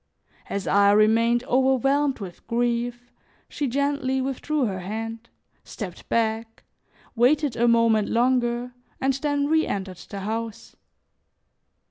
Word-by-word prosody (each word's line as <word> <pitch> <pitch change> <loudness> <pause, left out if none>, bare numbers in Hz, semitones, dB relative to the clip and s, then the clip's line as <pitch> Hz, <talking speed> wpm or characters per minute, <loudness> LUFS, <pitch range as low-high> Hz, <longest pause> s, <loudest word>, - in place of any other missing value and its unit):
As 200 -1 -3
I 200 0 +4
remained 230 +3 +3
overwhelmed 265 +2 +2
with 190 -5 -10
grief, 240 +1 -1 0.4
she 290 - -3
gently 275 0 0
withdrew 270 +2 -1
her 190 -4 -3
hand, 225 +4 -6 0.3
stepped 185 -6 -8
back, 225 0 -1 0.5
waited 270 +2 +3
a 240 +1 +2
moment 230 -2 +3
longer 245 0 +1 0.3
and 270 0 +1
then 285 +1 -1
reentered 200 - 0
the 200 -1 -6
house. 220 +1 -5
235 Hz, 110 wpm, -24 LUFS, 220-265 Hz, 0.5 s, I